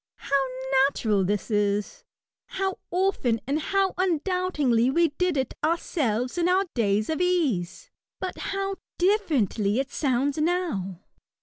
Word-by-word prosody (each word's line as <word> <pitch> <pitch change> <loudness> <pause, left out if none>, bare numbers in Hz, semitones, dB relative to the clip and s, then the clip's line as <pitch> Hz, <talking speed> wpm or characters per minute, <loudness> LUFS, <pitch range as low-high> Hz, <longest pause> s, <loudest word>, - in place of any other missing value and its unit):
How 275 0 0 0.5
natural 210 -7 0
this 205 +4 -2
is! 205 -1 0 0.4
How 385 0 -2
often 355 -11 +1
and 285 +3 0
how 390 +4 +1
undoubtingly 335 -9 +1
we 335 +4 +3
did 355 +1 -1
it 265 -2 -1
ourselves, 280 - 0
in 345 +1 +2
our 380 +2 +3
days 210 -2 +1
of 320 +2 -1
ease! 335 - 0 0.3
But 370 -1 -4
how 390 0 -3 0.5
differently 215 - +1
it 275 +1 -2
sounds 275 +1 0
now 305 - -1
285 Hz, 125 wpm, -26 LUFS, 225-360 Hz, 0.5 s, we